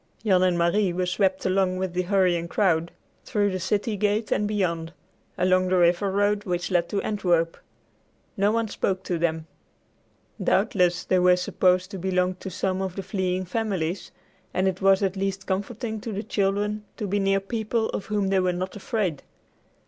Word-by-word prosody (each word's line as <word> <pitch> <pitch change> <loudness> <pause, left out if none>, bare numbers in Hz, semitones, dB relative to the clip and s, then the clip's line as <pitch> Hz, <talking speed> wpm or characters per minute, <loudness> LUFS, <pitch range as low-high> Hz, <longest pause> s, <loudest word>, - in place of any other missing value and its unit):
Jan 190 -3 +4
and 180 -1 +3
Marie 180 +3 +2
were 180 +1 0
swept 190 +1 0
along 185 -1 +1
with 185 -1 -2
the 180 - +1
hurrying 180 -3 +1
crowd, 170 -3 +1 0.3
through 205 -1 0
the 185 - -2
city 210 +4 -1
gate 210 +2 0
and 210 - +1
beyond, 170 -5 -1 0.4
along 185 0 +3
the 185 0 +2
river 175 +3 +3
road 205 +1 +1
which 180 -1 -2
led 175 -1 +1
to 200 - -1
Antwerp. 175 -5 +1 0.8
No 200 0 +2
one 230 0 0
spoke 190 -2 -2
to 175 -3 -2
them. 160 -1 -1 1.0
Doubtless 180 -3 +2
they 185 - +2
were 180 0 +5
supposed 180 +1 +1
to 195 - -6
belong 185 0 +1
to - - -6
some 190 0 -2
one 190 - 0
of 185 - -11
the 195 - -4
fleeing 185 -1 -1
families, 185 -3 -2 0.5
and 185 +1 +2
it 190 0 -2
was 195 +1 +4
at 195 0 0
least 195 0 -2
comforting 220 +3 -3
to 225 - -5
the 205 +1 -3
children 205 +1 -1
to 210 - -3
be 200 +1 0
near 195 0 +2
people 220 +2 -2
of - - -4
whom 205 -3 0
they 195 -1 +3
were 185 -1 +1
not 185 +1 -4
afraid. 200 - -2
190 Hz, 185 wpm, -25 LUFS, 180-205 Hz, 1.0 s, were